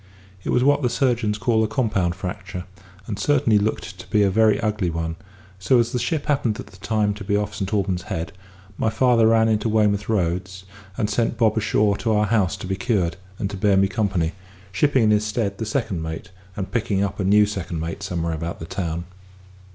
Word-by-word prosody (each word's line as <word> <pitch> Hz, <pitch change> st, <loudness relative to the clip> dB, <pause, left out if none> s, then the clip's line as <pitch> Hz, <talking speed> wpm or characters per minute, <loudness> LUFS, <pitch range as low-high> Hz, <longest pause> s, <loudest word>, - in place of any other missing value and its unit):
It -, -, -4 dB
was 125 Hz, -, +3 dB
what 145 Hz, +2 st, +4 dB
the 125 Hz, -, +1 dB
surgeons 120 Hz, -4 st, +1 dB
call 110 Hz, 0 st, +2 dB
a -, -, +1 dB
compound 105 Hz, -7 st, 0 dB
fracture, 95 Hz, 0 st, -6 dB, 0.4 s
and 100 Hz, 0 st, -5 dB
certainly 115 Hz, -3 st, +3 dB
looked 95 Hz, -3 st, -3 dB
to -, -, -11 dB
be 105 Hz, -2 st, +3 dB
a 100 Hz, -, +3 dB
very 110 Hz, 0 st, +4 dB
ugly 105 Hz, -4 st, 0 dB
one; 80 Hz, 0 st, -3 dB, 0.4 s
so, 110 Hz, +8 st, +3 dB
as 120 Hz, 0 st, +2 dB
the 125 Hz, -, -1 dB
ship 145 Hz, +5 st, -1 dB
happened 125 Hz, -6 st, 0 dB
at -, -, -6 dB
the 95 Hz, -, -16 dB
time 105 Hz, +1 st, 0 dB
to 100 Hz, 0 st, -8 dB
be 100 Hz, +1 st, 0 dB
off 105 Hz, 0 st, -2 dB
Saint 95 Hz, -1 st, -4 dB
Alban's 95 Hz, -4 st, 0 dB
Head, 85 Hz, +3 st, -3 dB, 0.5 s
my 110 Hz, -, +2 dB
father 115 Hz, 0 st, +4 dB
ran 110 Hz, 0 st, +4 dB
into 110 Hz, 0 st, +1 dB
Weymouth 105 Hz, -1 st, +2 dB
roads, 95 Hz, -2 st, -1 dB, 0.3 s
and 105 Hz, -, +1 dB
sent 115 Hz, +1 st, 0 dB
Bob 110 Hz, -1 st, +3 dB
ashore 105 Hz, -1 st, +2 dB
to 115 Hz, -3 st, 0 dB
our 105 Hz, 0 st, +3 dB
house 105 Hz, -2 st, +1 dB
to 95 Hz, -, -7 dB
be 95 Hz, +1 st, -1 dB
cured, 95 Hz, -6 st, 0 dB, 0.2 s
and 100 Hz, -, -2 dB
to 100 Hz, -, -5 dB
bear 100 Hz, 0 st, +3 dB
me 95 Hz, 0 st, +4 dB
company; 95 Hz, -6 st, 0 dB, 0.4 s
shipping 135 Hz, +4 st, +2 dB
in 105 Hz, -, +4 dB
his 105 Hz, 0 st, +3 dB
stead 105 Hz, -2 st, -2 dB
the 110 Hz, -, -3 dB
second 110 Hz, -7 st, -1 dB
mate, 80 Hz, +5 st, -6 dB, 0.2 s
and 95 Hz, -1 st, -4 dB
picking 105 Hz, -4 st, 0 dB
up 100 Hz, -, -3 dB
a -, -, 0 dB
new 105 Hz, +2 st, +5 dB
second 95 Hz, -5 st, -4 dB
mate 85 Hz, +5 st, -4 dB
somewhere 85 Hz, -4 st, -2 dB
about 85 Hz, +2 st, -4 dB
the 80 Hz, -, -7 dB
town. 85 Hz, -1 st, -3 dB
105 Hz, 215 wpm, -23 LUFS, 95-110 Hz, 0.5 s, new